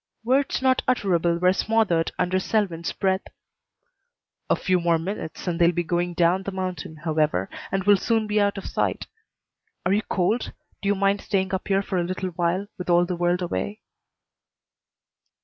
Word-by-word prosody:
Words 265 +2 +1
not 260 -1 +3
utterable 175 -8 +2
were 180 +1 +4
smothered 200 -6 +1
under 185 +1 +1
Selwyn's 185 -5 -1
breath. 190 0 0 1.3
"A - - +4
few 185 -1 +1
more 170 -1 +2
minutes 165 0 -5
and 175 -2 -2
they'll 170 0 +6
be 175 0 -1
going 175 +1 -1
down 175 +2 +3
the 195 - -5
mountain, 185 -4 -4
however, 155 - 0 0.2
and 195 0 0
will 205 +1 +6
soon 225 +3 +1
be 210 0 +1
out 200 0 +1
of 195 - -6
sight. - - -1 0.8
Are 185 - +3
you 210 - +2
cold? 210 +4 -1 0.3
Do 200 - -3
you 205 - +3
mind 200 +1 +1
staying 190 -1 -1
up 190 - -2
here 195 0 +2
for 190 -2 -1
a - - +1
little 185 +1 -3
while 175 +3 -1
with 180 - -5
all 175 0 +5
the 180 0 -3
world 175 +1 +1
away?" 100 - -3
185 Hz, 175 wpm, -24 LUFS, 170-200 Hz, 1.3 s, they'll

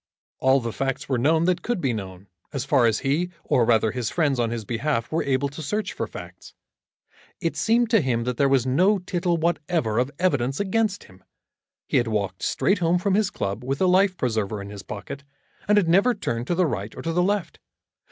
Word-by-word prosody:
All 130 +1 +4
the 115 -3 -4
facts 135 -1 -2
were 130 -3 0
known 160 +6 +3
that 180 0 +1
could 240 -4 -2
be 135 -7 0
known, 95 -3 -7 0.3
as 135 -2 -3
far 135 -4 +4
as 110 -1 0
he, 150 +6 0
or 120 - +2
rather 110 -2 +3
his 120 -2 -2
friends 145 -6 +1
on 115 -1 +1
his 115 -2 -4
behalf, 115 +2 -2
were 160 - +1
able 135 0 +1
to 145 +4 -9
search 210 +7 -2
for - - -3
facts. - - -11 0.8
It - - -2
seemed 230 +1 +2
to 225 - +5
him 120 -4 0
that 125 0 -3
there 140 -1 +3
was 135 -2 +3
no 180 +11 +3
tittle 175 -1 -1
whatever 160 -8 0
of 125 +2 +1
evidence 140 -7 0
against 205 0 0
him. 95 0 -19 0.6
He - - +1
had 120 - +2
walked 100 -4 -2
straight 195 +1 +1
home 170 0 +2
from 190 +2 0
his 205 0 +2
club 100 - -4
with 135 +2 -2
the 185 - +2
life 185 +1 +3
preserver 110 -4 -1
in 100 0 -8
his 100 -1 -8
pocket, 105 +9 -8 0.4
and 210 0 +4
had 195 -5 +3
never 200 +9 +4
turned 120 - -3
to 175 - 0
the 180 +1 +3
right 110 - -4
or - - -6
to 165 - -2
the 180 - +2
left. 200 0 -1
140 Hz, 220 wpm, -24 LUFS, 115-180 Hz, 0.8 s, to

